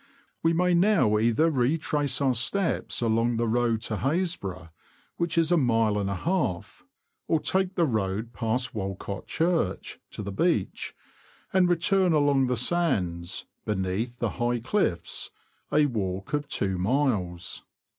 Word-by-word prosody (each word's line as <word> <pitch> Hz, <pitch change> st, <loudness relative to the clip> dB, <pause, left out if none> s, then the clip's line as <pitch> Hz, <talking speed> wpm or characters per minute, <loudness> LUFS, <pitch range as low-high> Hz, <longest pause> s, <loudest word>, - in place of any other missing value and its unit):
We 165 Hz, -, +3 dB
may 180 Hz, +1 st, +2 dB
now 170 Hz, -, +4 dB
either 120 Hz, +9 st, +3 dB
retrace 145 Hz, +1 st, 0 dB
our 135 Hz, -2 st, +3 dB
steps 170 Hz, -, 0 dB
along 115 Hz, +1 st, +1 dB
the 115 Hz, 0 st, 0 dB
road 115 Hz, -1 st, +1 dB
to 110 Hz, -, -3 dB
Happisburgh, 130 Hz, -, -2 dB, 0.5 s
which 170 Hz, -1 st, -1 dB
is 165 Hz, 0 st, +3 dB
a 175 Hz, -, +5 dB
mile 115 Hz, -6 st, +2 dB
and 100 Hz, -1 st, -1 dB
a 100 Hz, -, -1 dB
half, 160 Hz, -, -2 dB, 0.4 s
or 160 Hz, -, +2 dB
take 190 Hz, +3 st, 0 dB
the 170 Hz, -, +3 dB
road, 110 Hz, -2 st, -2 dB
past 115 Hz, +3 st, -1 dB
Walcott 95 Hz, -1 st, -5 dB
Church, 165 Hz, -, -1 dB
to -, -, -7 dB
the 100 Hz, -, -4 dB
beach, 110 Hz, -, -1 dB, 0.6 s
and 185 Hz, -1 st, +4 dB
return 175 Hz, +1 st, +3 dB
along 145 Hz, -3 st, +3 dB
the 125 Hz, -1 st, 0 dB
sands, 95 Hz, -, 0 dB, 0.2 s
beneath 105 Hz, +4 st, -2 dB
the -, -, -1 dB
high 120 Hz, 0 st, +1 dB
cliffs 120 Hz, -, -1 dB, 0.2 s
— -, -, -41 dB
a 150 Hz, 0 st, +4 dB
walk 100 Hz, -6 st, -3 dB
of 145 Hz, -1 st, 0 dB
two 95 Hz, -2 st, -1 dB
miles. 95 Hz, -6 st, -1 dB
120 Hz, 145 wpm, -27 LUFS, 105-165 Hz, 0.6 s, a